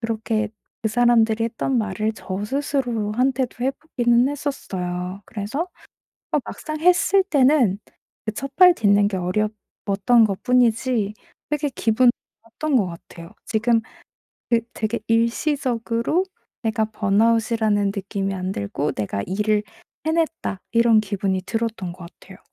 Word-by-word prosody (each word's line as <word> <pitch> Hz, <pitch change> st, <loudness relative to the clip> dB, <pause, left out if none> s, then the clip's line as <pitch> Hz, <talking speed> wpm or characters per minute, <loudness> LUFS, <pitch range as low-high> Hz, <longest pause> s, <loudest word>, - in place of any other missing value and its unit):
그렇게 220 Hz, -1 st, -1 dB, 0.3 s
그 220 Hz, -, +1 dB
사람들이 225 Hz, -1 st, +3 dB
했던 235 Hz, +2 st, -1 dB
말을 215 Hz, 0 st, -1 dB
저 190 Hz, -1 st, -5 dB
스스로한테도 250 Hz, -1 st, -1 dB
해 270 Hz, -, +2 dB
보기는 245 Hz, -4 st, +1 dB
했었어요. 185 Hz, -10 st, -4 dB
그래서 225 Hz, -, -4 dB, 0.7 s
어 300 Hz, -, +3 dB
막상 310 Hz, -1 st, -6 dB
했을 360 Hz, +3 st, +4 dB
때는 265 Hz, -, +3 dB, 0.5 s
그 215 Hz, -, -1 dB
첫발 275 Hz, -, +5 dB
딛는 205 Hz, -5 st, +3 dB
게 190 Hz, -, -2 dB
어려웠던 210 Hz, +3 st, +1 dB
것뿐이지 230 Hz, 0 st, +1 dB, 0.4 s
되게 295 Hz, -1 st, 0 dB
기분 235 Hz, +2 st, +3 dB, 0.3 s
좋았던 265 Hz, +5 st, -1 dB
것 205 Hz, -, +2 dB
같아요. 170 Hz, +1 st, -11 dB
지금 230 Hz, +1 st, +2 dB, 0.7 s
그 230 Hz, -, +5 dB
되게 220 Hz, +2 st, -2 dB
일시적으로 235 Hz, +4 st, +1 dB, 0.4 s
내가 220 Hz, 0 st, +1 dB
번아웃이라는 215 Hz, 0 st, +2 dB
느낌이 195 Hz, 0 st, -3 dB
안 185 Hz, 0 st, -3 dB
들고 140 Hz, -, -2 dB
'내가 100 Hz, -1 st, -3 dB
일을 210 Hz, +3 st, +1 dB, 0.4 s
해냈다.' 320 Hz, -, -1 dB
이런 230 Hz, -1 st, +5 dB
기분이 195 Hz, -2 st, -1 dB
들었던 225 Hz, -5 st, -3 dB
것 175 Hz, -1 st, -10 dB
같아요. 190 Hz, -1 st, -14 dB
225 Hz, 280 characters per minute, -22 LUFS, 200-250 Hz, 0.7 s, 첫발